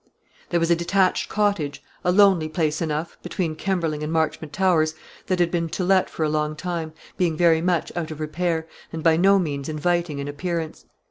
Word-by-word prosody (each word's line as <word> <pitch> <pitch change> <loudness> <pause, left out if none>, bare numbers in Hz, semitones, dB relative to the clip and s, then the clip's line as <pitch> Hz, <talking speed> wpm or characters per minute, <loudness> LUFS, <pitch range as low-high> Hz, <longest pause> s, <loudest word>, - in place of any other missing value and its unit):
There 170 - +2
was 165 0 +1
a - - +6
detached 185 +2 +1
cottage, 200 -9 0 0.2
a 180 - +3
lonely 190 -5 +4
place 155 0 -1
enough, 160 0 -3
between 175 -2 -3
Kemberling 165 -4 -1
and 150 +1 -3
Marchmont 160 -1 -1
Towers, 165 -4 +2 0.3
that 185 - +1
had 175 -1 +2
been 170 -2 -1
to 185 - -3
let 185 0 +3
for 160 - -3
a - - +2
long 150 0 -1
time, 165 -1 -4 0.3
being 170 -4 +1
very 165 -1 +4
much 175 -1 0
out 170 -2 -3
of 155 -1 -7
repair, 160 +1 -1 0.2
and 160 -1 -5
by 165 -1 +5
no 195 +4 +5
means 145 -6 -2
inviting 170 0 0
in 140 0 -4
appearance. 165 +2 -4
165 Hz, 195 wpm, -23 LUFS, 155-180 Hz, 0.3 s, a